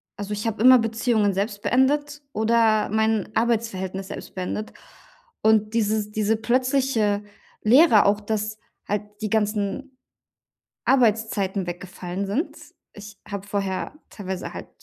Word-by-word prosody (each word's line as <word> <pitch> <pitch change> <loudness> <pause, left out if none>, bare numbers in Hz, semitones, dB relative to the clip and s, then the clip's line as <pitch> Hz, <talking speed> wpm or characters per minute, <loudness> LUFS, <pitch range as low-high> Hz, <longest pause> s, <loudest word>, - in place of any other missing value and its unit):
Also, 205 0 -5
ich 210 +2 -4
habe 225 -1 -2
immer 255 +2 +8
Beziehungen 225 -2 +1
selbst 200 +2 -3
beendet 290 +3 +1
oder 220 -1 +2
mein 220 -1 0
Arbeitsverhältnis 200 -5 -1
selbst - - -8
beendet. 190 +4 -4 0.7
Und 215 0 +3
dieses 215 -1 0
diese 215 +1 +1
plötzliche 240 -3 +1 0.4
Leere 235 0 +6
auch, 205 +1 +2
dass 215 0 -3 0.3
halt 205 0 0 0.2
die 215 - -3
ganzen 215 +5 -1 0.9
Arbeitszeiten 215 -6 +1
weggefallen 180 +2 -5
sind. 240 - -2 0.4
Ich 205 0 -11
habe 200 -1 -5
vorher 195 +3 -3 0.2
teilweise 190 -3 -6
halt - - -8
215 Hz, 120 wpm, -24 LUFS, 200-230 Hz, 0.9 s, immer